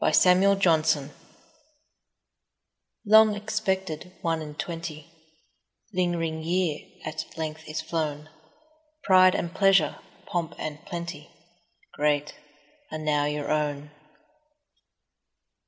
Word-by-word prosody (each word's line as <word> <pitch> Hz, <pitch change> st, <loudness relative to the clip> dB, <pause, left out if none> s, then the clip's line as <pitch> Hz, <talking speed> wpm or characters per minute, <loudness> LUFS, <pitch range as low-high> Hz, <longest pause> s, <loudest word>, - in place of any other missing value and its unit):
One -, -, +2 dB
and 195 Hz, +2 st, +5 dB
Twenty 155 Hz, -5 st, +2 dB, 1.9 s
LONG 215 Hz, 0 st, +6 dB
EXPECTED 190 Hz, -5 st, -3 dB
one 165 Hz, -2 st, 0 dB
and 150 Hz, -1 st, -8 dB
twenty, 165 Hz, -3 st, -5 dB, 0.9 s
Ling'ring 170 Hz, -3 st, -1 dB
year, 170 Hz, -2 st, 0 dB, 0.3 s
at 155 Hz, -, -4 dB
length 160 Hz, 0 st, -5 dB
is 155 Hz, -, -3 dB
flown: 155 Hz, -2 st, -3 dB, 0.7 s
Pride 185 Hz, -1 st, +6 dB
and 170 Hz, 0 st, -2 dB
pleasure, 195 Hz, -7 st, +3 dB, 0.3 s
pomp 170 Hz, -2 st, -3 dB
and 155 Hz, +1 st, -6 dB
plenty, 170 Hz, 0 st, -6 dB, 0.6 s
Great......., 150 Hz, 0 st, 0 dB, 0.6 s
are -, -, -3 dB
now 150 Hz, -2 st, +1 dB
your 150 Hz, 0 st, -2 dB
own. 150 Hz, -1 st, -1 dB
160 Hz, 95 wpm, -26 LUFS, 150-185 Hz, 1.9 s, LONG